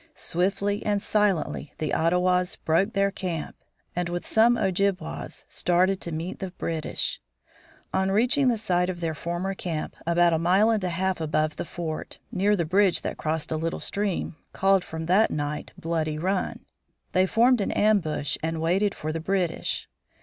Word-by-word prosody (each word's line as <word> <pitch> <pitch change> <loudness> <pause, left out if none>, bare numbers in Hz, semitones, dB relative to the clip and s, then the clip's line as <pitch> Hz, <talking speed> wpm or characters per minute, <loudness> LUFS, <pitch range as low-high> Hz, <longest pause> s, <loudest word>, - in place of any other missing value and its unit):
Swiftly 195 +3 -1
and 205 -1 +1
silently 200 -8 0
the 155 - -2
Ottawas 180 +2 +2
broke 190 +7 +1
their 200 0 +2
camp, 175 -5 -4 0.4
and 175 0 -1
with 175 0 -3
some 235 +2 +4
Ojibwas 195 -1 -1
started 185 +2 +1
to 170 - -4
meet 165 +3 -4
the 190 - -4
British. 165 -3 -3 0.7
On 190 0 +1
reaching 250 +7 +3
the 240 -2 +3
site 180 -4 +1
of 180 -2 -4
their 165 -2 -1
former 175 +5 -3
camp, 170 -5 -4
about 170 0 +4
a 160 - +2
mile 190 +6 +4
and 215 -3 0
a 180 - 0
half 185 +1 -1
above 155 -1 0
the - - -3
fort, 160 -2 -5
near 205 0 +2
the 170 -4 0
bridge 190 +3 +3
that - - -3
crossed 155 0 -2
a 160 - 0
little 165 +1 -2
stream, 200 -5 -1 0.2
called 195 -1 +3
from 160 0 -6
that 190 +6 +4
night 145 0 -3
Bloody 160 -3 -1
Run, 185 +4 -2 0.5
they 185 +1 +3
formed 240 +3 +4
an - - 0
ambush 180 -9 +1
and 160 0 -2
waited 190 +5 +1
for 155 - -4
the 165 - -2
British. 180 -1 -1
180 Hz, 170 wpm, -26 LUFS, 165-195 Hz, 0.7 s, some